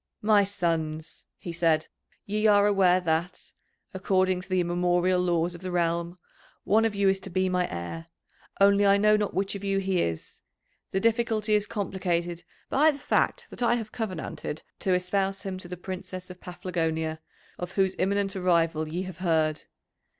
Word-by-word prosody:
"My 210 -1 +5
sons," 165 -4 -3
he 175 - -7
said, 165 -2 +2 0.4
"ye 215 +2 +1
are 205 -1 +5
aware 190 -3 +4
that, 170 +1 -2 0.4
according 185 -1 +1
to 185 - -13
the 185 0 +2
immemorial 175 +1 +1
laws 175 -1 +1
of 175 - -8
the 185 - -4
realm, 170 0 -1 0.5
one 220 +2 +3
of 220 -2 0
you 200 -1 +2
is 195 0 +3
to 195 - -7
be 185 +1 0
my 180 -1 0
heir, 85 -1 -6 0.5
only 200 +1 +5
I 200 0 +5
know 210 +1 +4
not 210 -1 -1
which 195 +1 0
of 200 -1 -6
you 195 -1 0
he 190 -2 +1
is; 80 -1 -4 0.5
the 190 - 0
difficulty 225 -1 +1
is 210 0 +2
complicated 175 -4 -2 0.2
by 300 +4 +4
the 295 - -1
fact - - 0
that - - -8
I 240 0 +3
have 220 -3 -5
covenanted 185 -7 -5 0.2
to 190 - +1
espouse 195 +1 -1
him 190 -2 -4
to 185 - -10
the 180 0 -7
Princess 185 0 -7
of 180 - -13
Paphlagonia, 160 -3 -3 0.4
of 180 +1 -5
whose 190 -1 +1
imminent 200 0 0
arrival 165 -4 +1
ye 175 +4 -3
have 185 -3 -8
heard. 160 -4 0
185 Hz, 175 wpm, -27 LUFS, 170-200 Hz, 0.5 s, My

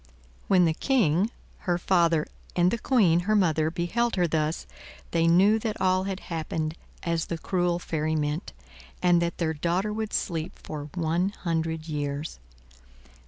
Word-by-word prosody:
When 180 -2 +5
the 160 - +2
King, 200 - +2 0.4
her 175 - +3
father, 170 -3 +2 0.3
and 175 +1 +4
the 235 - -1
Queen, 200 -10 +4
her 215 - +4
mother, 160 -5 +2
beheld 200 +9 0
her 180 -2 +2
thus, 155 0 -1 0.5
they 165 0 +2
knew 195 +6 +5
that 220 -1 -3
all 185 0 +2
had 195 0 -4
happened 160 -2 -3 0.3
as 170 -1 -1
the 170 - -3
cruel 175 0 0
fairy 155 -2 -2
meant, 150 +3 -2 0.5
and 175 -1 +5
that 170 0 -1
their 160 -2 0
daughter 175 +7 -1
would 220 0 -3
sleep 165 +1 -2
for 150 -1 -7
one 170 +2 +1
hundred 165 -4 -3
years. 145 - -3
170 Hz, 155 wpm, -27 LUFS, 160-185 Hz, 0.5 s, When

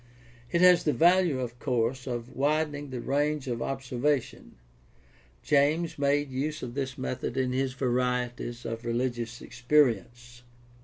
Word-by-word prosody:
It 170 - +2
has 180 -1 +7
the 150 - +1
value, 175 -4 +4
of 120 -1 -6
course, 125 -1 -1
of 120 0 -5
widening 145 0 0
the 125 -2 -5
range 145 +1 0
of 120 -2 -3
observation. 135 0 -2 0.9
James 150 +3 +2
made 140 0 +1
use 150 +4 -3
of 120 -1 -5
this 135 0 -3
method 130 -1 -4
in 130 -1 +1
his 130 0 -1
Varieties 125 -2 -2
of 115 0 -4
Religious 120 0 -2
Experience. 120 -2 0
130 Hz, 135 wpm, -28 LUFS, 120-145 Hz, 0.9 s, has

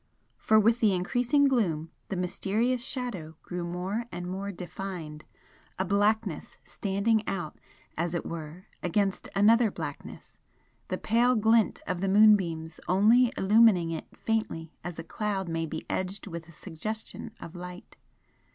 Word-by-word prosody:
For 220 - +4
with 230 +3 +4
the 210 -5 +4
increasing 245 +10 +2
gloom 165 - 0 0.2
the 195 - -2
mysterious 210 +7 0
Shadow 205 - -4
grew 175 -1 -4
more 180 +6 -3
and 175 +1 -5
more 195 +2 -4
defined 175 -4 -7 0.5
a 190 - 0
blackness 205 -4 0
standing 200 +5 0
out 175 -5 -4 0.4
as 170 +1 -1
it 170 - -2
were 165 +2 -7 0.2
against 195 +2 0
another 220 +3 +5
blackness, - - -8 0.5
the - - -2
pale 240 +3 +3
glint 225 0 +3
of 180 -1 -2
the 195 - +1
moonbeams 190 -6 +4
only 225 +6 +5
illumining 195 -4 +5
it 160 - -5
faintly 190 -8 -2
as 175 -2 -6
a - - -5
cloud 195 +2 -2
may 165 -1 -2
be 160 +1 -6
edged 190 +2 -3
with 170 -4 -7
a - - -14
suggestion 215 +8 -6
of 170 - -9
light. 180 0 -9
195 Hz, 140 wpm, -28 LUFS, 170-220 Hz, 0.5 s, another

